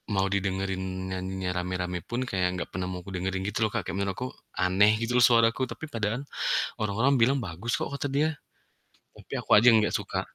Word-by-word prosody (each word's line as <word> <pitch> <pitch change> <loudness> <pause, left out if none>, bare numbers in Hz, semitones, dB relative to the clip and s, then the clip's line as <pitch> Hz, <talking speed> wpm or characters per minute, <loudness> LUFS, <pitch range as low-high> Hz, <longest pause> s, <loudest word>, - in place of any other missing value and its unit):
mau 95 0 +2
didengerin 95 -1 -1 0.3
nyanyinya 95 0 -3
rame-rame 90 0 -2
pun 120 +2 -1
kaya 95 -2 0
enggak 90 - -4
pernah 90 +1 -3
mau 90 - -4
aku 90 - -11
ngedengerin 95 0 -2
gitu 105 - -3
loh, 110 - -2
Kak. 115 - 0
Kayak - - -3
menurut 100 -1 -1
aku 125 - -3 0.4
aneh 100 +3 +5
gitu 115 +1 -1
loh 120 - +7
suaraku, 115 +1 +4
tapi - - -6
padahal 115 +2 -1 0.6
orang-orang 110 +6 +2
bilang, 130 +5 +4
"Bagus 105 0 -4
kok." - - -3
Kata 140 - -2
dia, 145 +3 +2 0.9
tapi - - -16
aku - - -15
aja 110 - +5
yang 110 - +6
enggak 105 - +1
suka. - - -3
100 Hz, 205 wpm, -27 LUFS, 95-115 Hz, 0.9 s, loh